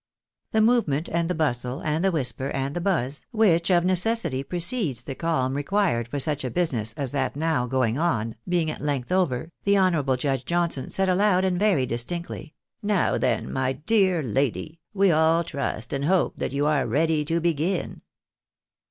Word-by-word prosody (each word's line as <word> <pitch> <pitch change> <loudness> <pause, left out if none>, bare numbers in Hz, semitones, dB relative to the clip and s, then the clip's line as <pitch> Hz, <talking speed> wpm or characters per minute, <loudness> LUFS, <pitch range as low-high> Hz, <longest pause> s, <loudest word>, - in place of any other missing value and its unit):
The 220 -1 +3
movement, 200 - +1
and 170 0 -1
the 180 - 0
bustle, 125 -4 -1
and 155 +1 -1
the 195 - +3
whisper, 135 -3 -1
and 135 +1 -3
the 175 - -2
buzz, 150 -7 -1
which 195 -7 +2
of 175 -1 +3
necessity 185 - +2
precedes 170 - -1
the 135 - -5
calm 130 -4 -1
required 145 - 0
for 145 - -4
such 145 0 0
a 130 - -2
business 120 -10 -1
as 135 -4 -2
that 135 -2 -1
now 155 -5 0
going 130 0 0
on, 115 -10 0 0.2
being 170 -3 +1
at - - -8
length 145 -1 -2
over, 170 -5 0
the 200 0 +2
honourable 155 -9 +2
Judge 135 -1 -1
Johnson 170 -4 -1
said 190 0 +1
aloud, 190 0 +3
and 180 -1 0
very 195 -11 +2
distinctly, 150 +8 -5
" - - -48
ISovr 205 -3 +1
then, 120 -3 -1
my 130 0 0
dear 185 0 +1
lady, 140 +6 -2
we 195 -2 +3
all 160 +1 +3
trust 155 -4 -4
and 140 0 -1
hope 185 +2 +2
that - - -3
you 140 +2 0
are 150 -4 +1
ready 155 +5 +1
to 165 +2 0
begin." 170 +2 -1
160 Hz, 180 wpm, -25 LUFS, 135-180 Hz, 0.2 s, The